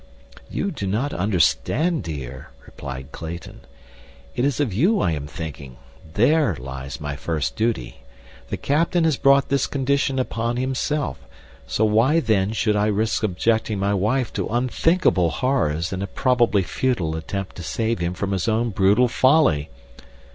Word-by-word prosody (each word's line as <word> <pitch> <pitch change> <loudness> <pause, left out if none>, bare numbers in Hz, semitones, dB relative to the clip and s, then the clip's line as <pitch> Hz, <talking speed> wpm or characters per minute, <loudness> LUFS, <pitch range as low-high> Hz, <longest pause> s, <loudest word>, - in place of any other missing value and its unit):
"You 200 - -2
do 100 -10 -4
not 115 +9 -1
understand, 110 - +1
dear," 70 - -7 0.2
replied 65 0 -8
Clayton. 85 +3 -8 0.7
"It 120 - 0
is 140 -1 0
of 135 -9 0
you 185 - +3
I 85 - +1
am 75 -2 -4
thinking—there 80 - -1
lies 65 0 -7
my 75 -1 -4
first 80 0 -2
duty. 110 - -1 0.5
The - - -3
captain 165 +4 +1
has 160 -3 +3
brought 140 0 +4
this 140 -1 +1
condition 140 0 0
upon 120 -2 -1
himself, 135 +3 -1 0.5
so 110 - +1
why 115 +9 +3
then 105 -7 +1
should 110 -1 +1
I 105 0 +2
risk 110 +1 0
subjecting 110 +2 0
my 100 +1 0
wife 110 +6 0
to - - -2
unthinkable 125 - +2
horrors 85 - 0
in 95 - -3
a 100 - -2
probably 120 -4 +2
futile 90 -7 -1
attempt 95 +4 -5
to 90 - -6
save 115 +4 -1
him 85 +1 -2
from 100 +1 -3
his 95 0 -1
own 115 +1 +1
brutal 100 +6 +4
folly? 130 - +3
110 Hz, 150 wpm, -22 LUFS, 85-130 Hz, 0.7 s, brought